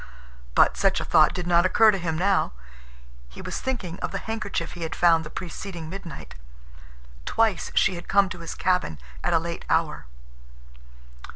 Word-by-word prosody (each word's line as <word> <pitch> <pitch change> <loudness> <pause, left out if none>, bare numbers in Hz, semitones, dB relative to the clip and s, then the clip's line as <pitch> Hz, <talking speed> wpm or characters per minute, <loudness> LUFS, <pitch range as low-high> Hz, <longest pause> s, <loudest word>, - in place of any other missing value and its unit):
But - - +4
such - - +2
a - - -4
thought - - +5
did 180 - -4
not 175 0 +4
occur 215 +4 +5
to 195 - -2
him 165 -2 -2
now. 190 - +1 0.8
He 60 - -13
was - - -5
thinking 205 -10 -4
of - - -3
the 195 - -2
handkerchief 200 -4 -4
he 175 - -9
had 160 - -3
found 165 -2 +4
the 155 - -8
preceding 170 -1 -7
midnight. 175 -6 -8 0.9
Twice 220 -6 +1
she 195 - +4
had 175 -1 -8
come 200 0 +4
to 185 -2 -7
his 165 - -6
cabin 180 - 0 0.3
at - - +1
a - - +6
late 170 +1 -4
hour. 155 - 0
175 Hz, 175 wpm, -25 LUFS, 165-195 Hz, 0.9 s, a